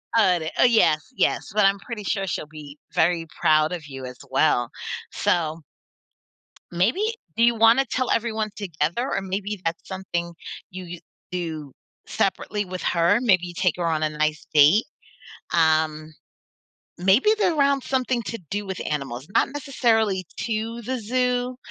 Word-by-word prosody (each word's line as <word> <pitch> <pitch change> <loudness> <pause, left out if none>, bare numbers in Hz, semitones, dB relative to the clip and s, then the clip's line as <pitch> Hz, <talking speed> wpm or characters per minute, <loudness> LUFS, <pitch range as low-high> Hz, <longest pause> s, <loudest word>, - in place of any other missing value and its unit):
Uh, 185 -6 +4
de 160 0 -3
uh, - - +6
yes, 220 - +3
yes, - - 0
but 210 -2 +4
I'm 195 0 +3
pretty 225 -2 -7
sure 195 -1 -1
she'll 165 - -3
be 150 -1 -11 0.2
very 165 0 +2
proud 155 +1 +4
of 165 -4 -6
you 135 -2 -8
as 125 0 -8
well. 130 -4 +2 0.4
So 165 -2 0 1.1
maybe 200 - +1 0.4
do 230 - +4
you 235 0 +5
wanna 230 +4 +5
tell 255 0 -1
everyone 220 -2 0
together 175 - -2
or 195 - 0
maybe 195 +1 -4
that's 165 0 -3
something 175 -3 -4 0.4
you 185 0 -7
you 170 0 -8 0.3
do 160 -6 -4 0.4
separately 205 -1 -1
with 185 0 -6
her? 175 +5 +3
Maybe 185 -7 +3
you 175 - -8
take 180 -2 +1
her 175 - -1
on 160 -1 0
a 155 - +1
nice 155 +1 -1
date? 155 - +6 0.7
Um, 155 -1 +2 0.9
maybe 195 - +4
they're 350 -6 +2
around 280 -2 +3
something 255 -2 0
to 230 - -4
do 205 0 -3
with 190 -1 -5
animals, 135 -2 -4
not - - +4
necessarily 225 -9 +1 0.2
to 225 +1 -3
the 255 +3 -3
zoo, 250 +2 0
185 Hz, 160 wpm, -24 LUFS, 160-230 Hz, 1.1 s, uh